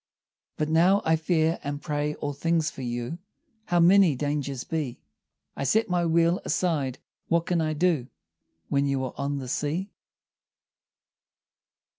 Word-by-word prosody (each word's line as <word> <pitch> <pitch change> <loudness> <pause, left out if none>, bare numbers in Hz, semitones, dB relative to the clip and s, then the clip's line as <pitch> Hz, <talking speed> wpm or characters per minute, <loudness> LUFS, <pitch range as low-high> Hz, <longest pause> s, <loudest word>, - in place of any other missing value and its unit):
But 155 - 0
now 175 +5 +4
I 160 - +4
fear 160 0 +1
and 145 0 -3
pray 150 +1 -2
all 145 -1 -4
things 165 +2 0
for 135 - -9
you, 120 +6 -4 0.5
How 175 - +2
many 180 -2 +6
dangers 140 -2 -2
be! 150 -7 -3 0.6
I - - -3
set 200 - +2
my 175 -1 +2
wheel 170 +2 +3
aside, 145 -8 0 0.3
what 170 0 +1
can 175 -3 +1
I 155 -1 0
do 155 -5 +1 0.6
When 140 0 +1
you 135 -1 0
are 130 - -6
on 140 0 -2
the 130 -2 -5
sea? 155 +9 -2
155 Hz, 145 wpm, -26 LUFS, 140-170 Hz, 0.6 s, many